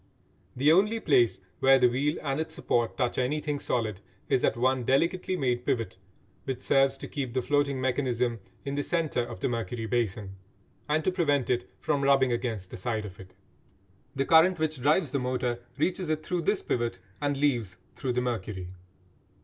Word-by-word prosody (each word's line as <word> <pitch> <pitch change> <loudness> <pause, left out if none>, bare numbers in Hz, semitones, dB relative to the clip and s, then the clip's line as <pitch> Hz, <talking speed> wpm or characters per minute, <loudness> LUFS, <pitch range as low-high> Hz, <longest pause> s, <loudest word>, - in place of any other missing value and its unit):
The 140 +4 +4
only 210 +6 +3
place 125 - +3 0.2
where 135 0 +6
the 125 - +5
wheel 135 +5 0
and 140 0 -1
its 160 0 -4
supports 120 -9 0
touch 125 -2 0
anything 145 +3 -1
solid 110 -7 -2 0.3
is 130 - +2
at - - +2
one 130 +1 +2
delicately 170 +9 +1
made 125 -4 0
pivot 115 -6 -1 0.5
which 130 -2 -3
serves 135 0 +3
to - - -7
keep 135 -4 -4
the 130 - +2
floating 145 -1 +1
mechanism 125 -3 0 0.3
in 140 - -3
the 145 - 0
centre 160 -4 0
of 105 - -8
the - - +1
mercury 115 -1 -3
basin, 105 -4 -2 0.5
and 155 +1 +2
to 185 - +2
prevent 145 -9 +1
it 120 -1 -1
from 145 -2 0
rubbing 135 -2 +4
against 115 -6 -3
the - - -6
side 110 +2 -2
of 95 -2 -10
it. 95 -1 -13 0.8
The 135 0 0
current 165 +4 +6
which 155 -4 -2
drives 150 +2 +2
the 140 - 0
motor 125 -1 -1 0.2
reaches 180 +3 0
it 155 0 -1
through 180 -1 -1
this 200 +5 0
pivot 120 -4 -1 0.2
and 145 -1 0
leaves 120 -10 0 0.2
through 130 -2 -2
the 125 - +1
mercury. 110 -7 -3
130 Hz, 180 wpm, -28 LUFS, 120-150 Hz, 0.8 s, where